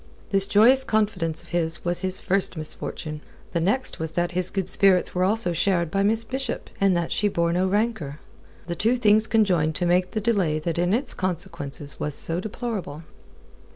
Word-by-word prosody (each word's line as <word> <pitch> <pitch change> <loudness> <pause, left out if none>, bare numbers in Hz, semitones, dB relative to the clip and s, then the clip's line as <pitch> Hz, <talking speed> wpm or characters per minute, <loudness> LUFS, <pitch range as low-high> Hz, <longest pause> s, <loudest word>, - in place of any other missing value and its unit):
This 195 -1 +4
joyous 240 +6 +5
confidence 185 -9 -1
of 170 - -14
his 165 -1 +1
was 175 0 0
his 190 0 +1
first 195 -2 0
misfortune. 155 0 -5 0.3
The 170 - +1
next 215 +10 -1
was 160 0 -4
that 175 0 -1
his 180 0 0
good 195 -2 -3
spirits 190 -1 +3
were 180 - 0
also 195 -2 0
shared 170 -1 0
by 195 - 0
Miss 220 +3 +2
Bishop, 260 +2 -5
and 195 -2 +3
that 170 -1 -2
she 210 - +1
bore 170 -4 0
no 185 +2 +1
rancour. 195 -8 -2 0.5
The 175 - -4
two 225 +8 +1
things 215 -2 +3
conjoined 180 -8 +2
to 175 - -1
make 180 +1 +2
the 215 - -3
delay 200 -8 0
that 165 +2 -3
in 175 +1 +1
its 245 +5 -1
consequences 170 -6 -4
was 150 -1 -3
so 165 +3 +4
deplorable. 200 - -5
185 Hz, 190 wpm, -24 LUFS, 170-210 Hz, 0.5 s, joyous